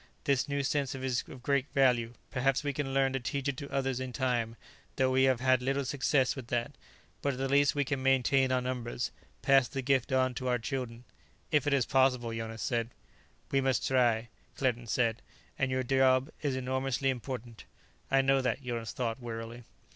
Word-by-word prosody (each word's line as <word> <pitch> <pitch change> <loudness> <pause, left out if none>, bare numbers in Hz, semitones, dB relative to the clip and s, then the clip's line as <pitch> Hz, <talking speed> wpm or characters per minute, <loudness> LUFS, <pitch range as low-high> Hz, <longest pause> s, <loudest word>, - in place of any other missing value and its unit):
This 140 -1 +1
new 140 0 0
sense 140 -1 0
is 130 -1 -1
of 125 - -11
great 140 0 +1
value; 125 -4 +3 0.2
perhaps 135 +2 +1
we 145 -1 -1
can 135 -1 -2
learn 135 0 +2
to 135 - 0
teach 135 +3 -3
it 140 - 0
to 140 - -6
others 135 -2 -1
in 130 -1 -4
time, 120 -2 -1 0.4
though 130 -1 +2
we 130 +1 +4
have 130 -2 +2
had 130 -1 +3
little 135 +2 0
success 135 -1 +1
with 130 -4 -7
that. 120 +2 -1 0.5
But 140 - 0
at - - -7
the 135 +1 -1
least 140 +1 +3
we 145 -1 +1
can 135 0 -2
maintain 135 0 +3
our 130 0 +2
numbers, 125 -1 -3 0.3
pass 135 -2 +5
the 135 -2 -4
gift 135 0 +1
on 130 -1 +2
to 130 +1 -4
our 125 -1 +2
children 120 -1 -4 0.2
" - - -35
"If 150 -1 +2
it 145 - +3
is 130 - +2
possible," 125 -3 +2
Jonas 115 0 -5
said. 115 -1 -1 0.6
"We 135 - +3
must 130 -1 +1
try," 120 -3 +2 0.3
Claerten 120 -3 0
said. 115 +1 +1 0.4
"And 130 - +1
your 130 0 0
job 130 +2 +3
is 140 -3 0
enormously 130 +1 0
important." 120 -3 -6 0.4
"I 135 0 +4
know 135 0 +3
that," 130 +2 -1
Jonas 120 -2 -4
thought 120 0 -3
wearily. 115 0 -6
130 Hz, 200 wpm, -31 LUFS, 120-135 Hz, 0.6 s, pass